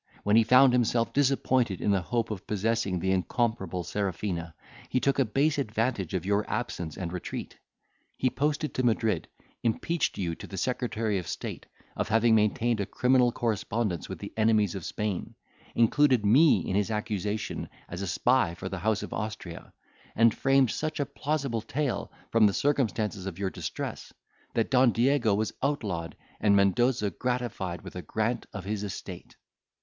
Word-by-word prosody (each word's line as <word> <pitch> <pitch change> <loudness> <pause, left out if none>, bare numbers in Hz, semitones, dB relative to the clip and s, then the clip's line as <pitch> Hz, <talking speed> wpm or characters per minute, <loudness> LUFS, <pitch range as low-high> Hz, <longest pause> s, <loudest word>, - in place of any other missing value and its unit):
when 105 +1 +3
he 115 - +7
found 125 +3 +6
himself 120 -1 +2
disappointed 130 -7 +2
in 105 - +1
the 95 -2 +2
hope 115 +6 -1
of 100 -2 -6
possessing 105 -2 0
the 95 +2 0
incomparable 95 -2 -1
Serafina, 90 -4 -3 0.3
he 130 - +1
took 140 +1 +1
a 135 - +4
base 145 +7 +1
advantage 110 - -1
of 90 -1 -2
your 100 +1 +2
absence 100 -8 -3
and 85 -2 -4
retreat. 90 - -5 0.6
He 130 - +1
posted 150 +1 -1
to 130 - -1
Madrid, 110 -6 +1 0.3
impeached 155 +8 0
you 85 -4 -1
to - - -9
the 95 - -7
secretary 110 -3 -1
of 85 - -7
state - - -5 0.3
of - - -2
having 115 +1 +4
maintained 110 +2 +2
a 100 - -1
criminal 125 +2 +3
correspondence 110 -5 -2
with - - -5
the - - -8
enemies 110 -3 +3
of 95 - -6
Spain, 105 -1 -3 0.4
included 125 0 +4
me 120 - +5
in 95 - -1
his 100 +1 +1
accusation, 105 -1 -3 0.2
as 90 +2 -6
a 100 - -3
spy 100 0 +2
for 95 - -6
the 95 - -4
house 105 +4 0
of - - -6
Austria, 105 -6 -6 0.4
and 115 0 +5
framed 135 -3 +3
such 155 0 -3
a 145 - +1
plausible 135 -7 -2
tale, 135 +4 -2 0.2
from 115 -2 +6
the 100 - 0
circumstances 110 -8 0
of 90 -3 -5
your 95 -1 -2
distress, - - -5 0.4
that 115 +2 +1
Don 125 -2 +5
Diego 120 -3 +3
was 110 +1 -1
outlawed, 105 - -2 0.2
and 100 -2 +4
Mendoza 105 +2 +2
gratified 110 -6 -3
with - - -10
a 90 - -4
grant 110 +8 -2
of 95 -2 -7
his 105 0 -2
estate. 100 - -7
110 Hz, 170 wpm, -28 LUFS, 95-125 Hz, 0.6 s, he